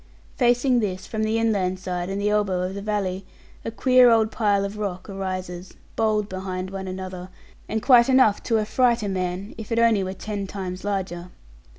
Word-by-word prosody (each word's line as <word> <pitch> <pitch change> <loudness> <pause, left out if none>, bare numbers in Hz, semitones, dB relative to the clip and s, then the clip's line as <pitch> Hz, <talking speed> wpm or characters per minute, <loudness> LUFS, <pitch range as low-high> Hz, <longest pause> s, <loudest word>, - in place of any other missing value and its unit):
Facing 245 0 +3
this, 190 -4 -3
from 220 - -4
the 220 +1 +1
inland 200 -5 +1
side 180 -1 -4
and 195 +1 -3
the 205 +1 +1
elbow 200 -4 +1
of 185 +1 -3
the 200 - -5
valley, 200 -2 -2 0.4
a - - -3
queer 250 +2 +5
old 225 -1 +3
pile 205 -3 +1
of 205 +2 -6
rock 190 -3 -4
arises, 185 -2 -5 0.2
bold 215 -2 +1
behind 185 -1 -5
one 190 -1 -5
another, 185 -1 -6 0.4
and 220 0 -2
quite 245 -2 +6
enough 255 -6 +4
to 225 - +2
affright 235 +2 +2
a - - -1
man, 185 +1 -3
if 220 - -8
it 230 - 0
only 230 -4 +4
were 185 0 -4
ten 200 +1 -5
times 185 -2 -6
larger. 185 -3 -3
200 Hz, 190 wpm, -24 LUFS, 185-220 Hz, 0.4 s, quite